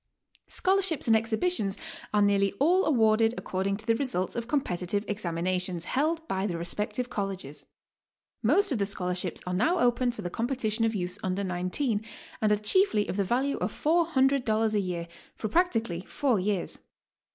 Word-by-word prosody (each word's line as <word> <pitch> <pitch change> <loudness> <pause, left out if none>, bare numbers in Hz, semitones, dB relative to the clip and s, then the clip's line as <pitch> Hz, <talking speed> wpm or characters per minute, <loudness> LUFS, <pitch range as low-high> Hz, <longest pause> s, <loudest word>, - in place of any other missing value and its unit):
Scholarships 380 -5 +1
and 225 - +5
exhibitions 220 - +1 0.3
are 210 -1 +3
nearly 200 -1 +3
all 340 - +3
awarded 225 -4 +3
according 195 +1 -2
to 220 - -11
the 230 - +3
results 225 -8 -1
of 235 -1 -3
competitive 200 - -1
examinations, 180 -2 -1
held 320 +4 0
by 190 -4 -1
the 175 -4 -3
respective 210 +8 -2
Colleges. 190 - -4 0.7
Most 325 - +3
of 250 - 0
the 200 - +1
scholarships 180 -2 -2
are 180 - -3
now 245 - +2
open 245 -1 +2
for 235 - -8
the 175 - -4
c^ipetition 225 -2 0
of 220 - -2
youths 180 0 -3
under 190 +1 -1
nineteen, 195 +6 -1 0.4
and 215 -1 +3
are - - +6
chiefly 210 - +2
of - - -3
the 200 - +1
value 260 +8 0
of - - -1
$400 270 -9 +2
a 210 - +2
year 175 -3 -3 0.3
for 220 - -3
practically 225 - +1
four 245 +2 0
years. 195 -1 -1
215 Hz, 165 wpm, -28 LUFS, 190-260 Hz, 0.7 s, are